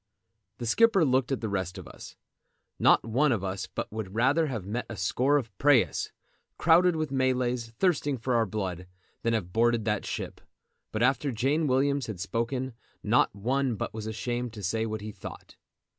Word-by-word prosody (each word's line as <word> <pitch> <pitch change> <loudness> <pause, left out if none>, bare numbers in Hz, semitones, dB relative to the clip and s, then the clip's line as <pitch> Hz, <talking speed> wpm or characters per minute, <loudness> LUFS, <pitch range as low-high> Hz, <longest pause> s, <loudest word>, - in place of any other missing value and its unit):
The 120 - -5
skipper 200 - +4
looked 130 -1 +2
at 135 - -1
the 110 - -2
rest 95 -2 -3
of 95 - -9
us. - - -11 0.6
Not - - +5
one 130 +6 +2
of 110 -6 0
us 95 0 -3
but - - -5
would 105 -2 -5
rather 140 +8 +3
have 115 -9 -4
met 115 +5 -3
a 110 - -5
score 130 +9 +2
of 110 -8 -4
prahus, 145 -4 +3 0.5
crowded 175 +1 +5
with 155 -3 -2
Malays 125 -3 0
thirsting 145 +2 0
for 125 +2 -2
our 115 -2 +3
blood, 90 -4 -4 0.3
than 115 - +1
have 90 -6 -2
boarded 115 -1 +2
that 105 -2 0
ship; - - -5 0.5
but 110 +1 0
after 135 +2 +2
Jane 140 +7 +1
Williams 140 0 +1
had 105 -5 -6
spoken 120 +6 -2 0.3
not - - +3
one 125 +4 0
but - - -4
was 110 -1 -5
ashamed 120 +2 -3
to 105 -3 -8
say 110 +5 0
what 110 -1 -4
he 105 +1 -6
thought. - - -10
120 Hz, 185 wpm, -28 LUFS, 110-135 Hz, 0.6 s, Not